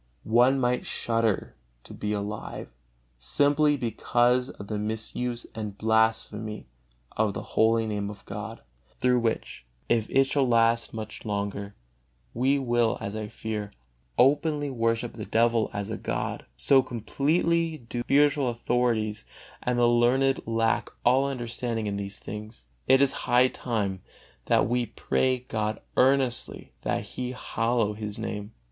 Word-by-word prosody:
One 125 +4 +4
might 125 0 +1
shudder 115 -3 0 0.3
to - - -11
be 105 - -3
alive, 105 0 -4 0.5
simply 145 - +2
because 120 +1 +1
of 100 - -9
the 105 0 -3
misuse 110 +3 -3
and 105 -2 -5
blasphemy 110 -1 +1 0.5
of 110 -2 +1
the - - -4
holy 115 0 +3
Name 105 -2 -2
of 105 -1 -10
God; - - -6 0.4
through 125 0 +3
which, 115 - -2 0.3
if 115 -2 +2
it 135 - +5
shall 135 0 +1
last 115 -1 +3
much 110 -1 -7
longer, 100 -1 -3 0.6
we 135 +3 +2
will, 120 -4 +1
as 100 +1 -5
I 110 -1 -4
fear, 105 -1 -5 0.4
openly 145 +1 +3
worship 115 -1 0
the 110 - -6
devil 115 0 +2
as 100 +1 -4
a 110 - -3
god; - - -3
so 135 - +5
completely 155 +7 0
do 120 -2 -6
the 120 - -3
spiritual 145 -1 +3
authorities 120 -2 0 0.4
and 125 0 0
the 120 - +4
learned 125 +3 +3
lack 115 0 +1 0.2
all 130 +3 +5
understanding 120 -3 -3
in 100 -1 -2
these 100 0 -5
things. 105 - -8 0.2
It 130 +1 +6
is 135 - +3 0.2
high 125 +1 +5
time 100 -8 -2 0.4
that - - +3
we 120 0 0
pray 130 +3 0
God 110 0 -2 0.2
earnestly 130 -2 +1
that - - -1
He 125 0 -5
hallow 115 -3 0
His 105 -1 -5
Name. 105 -1 -5
115 Hz, 140 wpm, -27 LUFS, 110-125 Hz, 0.6 s, It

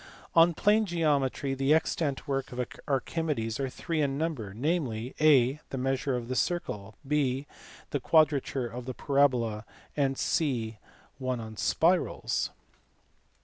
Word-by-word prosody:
(i) 165 - +8
On 170 0 +5
plane 210 +3 +3
geometry 145 -5 +1
the 135 +3 +3
extant 155 -3 -1
works 135 -1 -2
of 125 0 -2 0.2
Archimedes 135 -4 -1
are 135 -1 -1
three 160 +4 -2
in 140 -2 0
number, 145 -11 -2
namely, 125 - -2
(a) 140 -2 +5
the 135 - -4
Measure 135 +1 0
of 120 -1 -4
the 130 - -3
Circle, 110 - -2
(b) 140 -2 +1 0.5
the 145 - 0
Quadrature 140 -3 +2
of 120 +1 -6
the 130 - -4
Parabola, 125 -7 +2 0.3
and 135 -2 +1
(c) 115 -8 0 0.4
one 130 -2 -2
on 110 -1 -7
Spirals. 175 +10 +1
135 Hz, 140 wpm, -29 LUFS, 125-155 Hz, 0.5 s, i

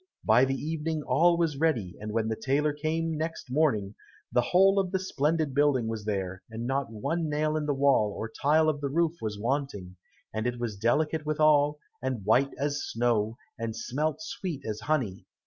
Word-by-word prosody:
By 130 - +6
the 135 0 -1
evening 155 +1 -3
all 170 +3 +3
was 165 -4 0
ready, 120 - 0
and 105 0 -5
when 110 0 0
the 110 - -1
tailor 140 +6 +1
came 160 +2 -1
next 160 -4 -4
morning, 125 -9 +1 0.4
the 125 - +3
whole 195 +9 +4
of 185 -2 -1
the 190 - +1
splendid 155 -5 0
building 140 -4 +2
was 110 -2 -4
there, 95 -3 -2
and 115 +1 -5
not 135 -1 -1
one 160 +9 -2
nail 155 +1 0
in 150 -1 -1
the 145 - +1
wall 135 -6 +3
or 110 - -4
tile 150 +7 +2
of 150 -2 0
the 140 - -1
roof 165 +2 +1
was 105 -2 -3
wanting, 110 -6 -3 0.4
and 110 +2 -1
it 120 0 -3
was 115 -4 -3
delicate 150 +9 +1
withal, 150 -1 +3 0.2
and 130 -6 -3
white 125 +6 +4
as 145 +1 -1
snow, 115 -1 0 0.2
and 115 -1 -3
smelt 155 +4 -2
sweet 165 -2 -5
as 110 -1 -3
honey. 115 -8 -2
140 Hz, 190 wpm, -28 LUFS, 115-155 Hz, 0.4 s, By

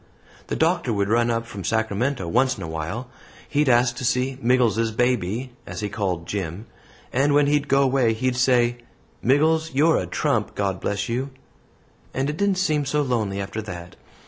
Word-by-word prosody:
The - - -2
Doctor - - +1
would 100 -2 0
run 120 +1 +3
up 115 0 -1
from 100 -4 -8
Sacramento 110 +2 -1
once 125 +6 +2
in - - -6
a - - -4
while. 80 +10 -4 0.4
He'd 145 -1 +1
ask 120 0 +4
to - - -5
see 125 +2 +1
'Miggles's 115 -3 +2
baby,' 120 +1 0 0.2
as - - -6
he 105 - -2
called 90 -5 -2
Jim, 95 +1 -4 0.5
and 140 +3 +3
when 145 0 +5
he'd 145 0 +1
go 140 0 +4
away, 130 -4 +2
he'd 125 +3 -1
say, 125 -1 +3 0.4
'Miggles; 160 +3 +2
you're 155 +4 +4
a - - -4
trump - - -1
God 95 -3 -1
bless 100 +2 -2
you'; 125 +3 -2 0.9
and 135 +2 0
it 150 - -7
didn't 200 -1 +1
seem 155 -5 +1
so 145 +2 0
lonely 110 -7 -1
after 100 +3 -4
that. 90 -4 -8
120 Hz, 180 wpm, -23 LUFS, 105-135 Hz, 0.9 s, when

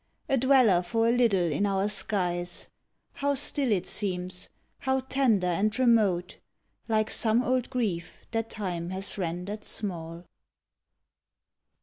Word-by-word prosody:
A 270 - +2
dweller 255 -8 +4
for 225 +6 0
a - - +4
little 205 -9 +2
in 200 +8 0
our 195 0 0
skies, 180 -4 -1 0.4
How 285 0 -1
still 275 -2 +3
it 190 -4 +1
seems, 185 -3 -2 0.3
how 265 0 0
tender 255 -7 +1
and 195 +6 0
remote, 215 -8 +2 0.5
Like 215 -1 +1
some 230 +2 +2
old 255 -1 0
grief 195 -9 -3
that 225 -1 -2
time 175 -5 -4
has 190 +2 -4
rendered 180 +4 -4
small 170 -4 -3
205 Hz, 125 wpm, -27 LUFS, 180-240 Hz, 0.5 s, dweller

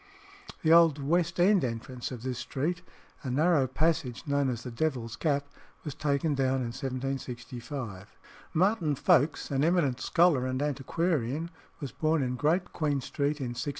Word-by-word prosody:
The 160 0 +5
old 165 -3 +6
West 170 +4 0
End 190 +2 +5
entrance 120 +1 -4
of 120 -2 -7
this 130 -1 -3
street, 145 +8 -2 0.4
a 135 - -5
narrow 145 +1 +3
passage 155 -2 -1
known 140 -2 +1
as 120 -2 -4
the 125 - -6
"Devil's 120 -4 -2
Gap," 145 -3 0 0.4
was 150 - -4
taken 145 +1 0
down 135 -1 +1
in 120 -2 -3
1765. 125 -5 -5 0.4
Martin 175 -4 +2
Folkes, 145 +3 +2
an 135 0 +1
eminent 160 -7 +2
scholar 165 -7 +3
and 130 0 -2
antiquarian, 150 +1 -1 0.3
was 140 -5 -5
born 155 -2 +1
in 125 0 -1
Great 160 +7 0
Queen 150 -4 0
Street 145 +3 -2
in 130 -3 -3
1690. 125 +4 -3
140 Hz, 155 wpm, -29 LUFS, 130-160 Hz, 0.4 s, old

